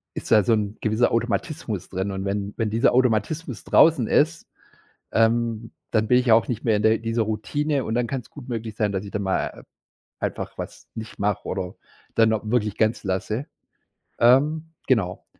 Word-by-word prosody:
ist - - -6
da 105 -3 +6
so 115 - +3
‘n 105 0 -1
gewisser 110 +2 +2
Automatismus 115 - -2
drin. 95 +2 -2
Und, 95 0 -4
wenn 100 +1 -2
wenn 110 -2 0
dieser 115 +3 +3
Automatismus 130 +3 0
draußen 155 -8 +5
ist, 160 +2 +2 0.7
ähm, 115 0 +1 0.2
dann 110 -1 +2
bin 125 +3 +5
ich 125 - 0
ja 115 - +7
auch 110 -3 +3
nicht 115 -3 -3
mehr 110 -3 +3
in 105 - -1
der 110 +1 +4
dieser 115 0 -1
Routine 135 +6 -1
und 110 - -2
dann 120 0 +1
kann's 130 -2 -5
gut 135 -4 -11
möglich 110 -2 -4
sein, 105 -3 0
dass 95 +1 -3
ich 100 - -8
dann 105 - -3
mal, 95 -1 0
äh, - - -13 0.6
einfach - - -4
was - - -8
nicht 110 0 -8
mache 100 -1 -1
oder 90 0 -3 0.4
dann 110 -1 +4
auch 110 - -1
wirklich 110 -3 0
ganz 110 0 +1
lasse, 105 +7 -2 0.7
ähm, 150 +7 +3 0.2
genau. 100 -8 0
110 Hz, 190 wpm, -24 LUFS, 105-125 Hz, 0.7 s, ja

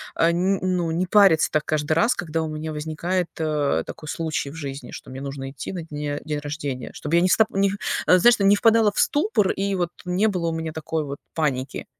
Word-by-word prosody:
а, 165 +1 +3
нь 185 +3 +1
ну, 180 -3 0
не 170 +3 0
париться 195 -6 +5
так 155 -1 0
каждый 155 0 0
раз, 200 +10 +3
когда 165 -2 -2
у - - -3
меня 155 +1 -5
возникает, 165 +4 -2
а, 150 -2 0
такой 155 - -9
случай 155 -3 -3
в - - -11
жизни, 140 -5 -7
что - - -10
мне 130 - -7
нужно 135 -1 -5
идти 145 - -7
на 175 - -5
дне 145 -2 -4
день 150 -1 -2
рождение, 145 -3 -5
чтобы 155 +3 -2
я - - +4
не 185 - +3
стап 220 +3 +4
не, 195 0 +2 0.3
а, 180 - +6
знаешь, 240 +5 +5
ну, 200 - +2
не 200 - +6
впадала 225 0 +4
в - - -13
ступор. 290 - +2
И 195 0 -1
вот 175 - 0 0.2
не 180 +4 +1
было 180 -5 -1
у - - -3
меня 160 -1 -4
такой 160 0 -3
вот 140 0 -6 0.2
паники. 140 -4 -2
160 Hz, 230 wpm, -23 LUFS, 150-185 Hz, 0.3 s, а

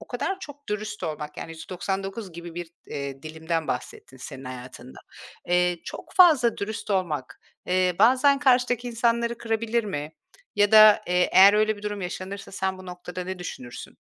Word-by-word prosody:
o - - -12
kadar 385 0 -3
çok 290 -3 -11
dürüst 210 0 -4
olmak, 150 -1 -5
yani, - - -7
%99 190 +4 -5
gibi 170 0 -9
bir, 175 -1 -6 0.2
eee, 140 -1 -6
dilimden 160 +1 -3
bahsettin 130 - -5
senin 130 +1 -9
hayatında. 125 - -9 0.5
Eee, 180 0 +2
çok - - -9
fazla 300 - +6
dürüst 215 +1 -5
olmak, 150 -9 -2 0.3
eee, 180 -1 +1
bazen 260 +6 +5
karşıdaki 245 -3 +2
insanları 235 0 0
kırabilir 230 0 -1
mi? 150 -5 -5 0.4
Ya 205 +1 +3
da, 215 -1 +8
eee, 180 0 +2
eğer 195 +2 +8
öyle 215 0 +2
bir 205 - -13
durum 205 -1 -4
yaşanırsa 190 +2 -6
sen 190 0 -2
bu 185 - -11
noktada 180 0 -7
ne 185 0 -5
düşünürsün? 125 -8 -8
190 Hz, 160 wpm, -25 LUFS, 165-220 Hz, 0.5 s, da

